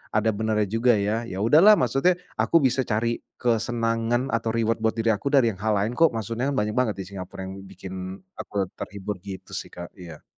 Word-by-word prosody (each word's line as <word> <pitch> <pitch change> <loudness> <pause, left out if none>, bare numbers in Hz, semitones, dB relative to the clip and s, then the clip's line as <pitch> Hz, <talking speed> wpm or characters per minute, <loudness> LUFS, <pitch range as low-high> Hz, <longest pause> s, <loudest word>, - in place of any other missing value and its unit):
ada 110 +1 +3
benarnya 110 0 +1
juga 115 +3 +3
ya. 105 +3 0
Ya 95 -3 -5
udahlah 160 - +7
maksudnya 135 +8 +3 0.3
aku 165 -2 +4
bisa 130 -1 +2
cari 115 +2 0 0.2
kesenangan 115 +1 0
atau 115 0 -1
reward 115 -1 +1
buat 110 - +2
diri 115 0 0
aku 110 +6 -2
dari 130 -5 +5
yang 95 - -12
hal 110 +1 +1
lain 105 +4 0
kok 165 -1 +5
maksudnya 115 +4 -2
banyak 105 -3 0
banget 125 -5 +2
di 95 - -7
Singapura 95 -2 -8
yang 95 0 -6
bikin 95 0 -9 0.5
aku 100 -1 -2 0.2
terhibur 100 +1 -5
gitu 95 0 -9
sih, - - -5
Kak, 85 0 -8
iya. 85 -4 -10
115 Hz, 195 wpm, -25 LUFS, 100-120 Hz, 0.5 s, udahlah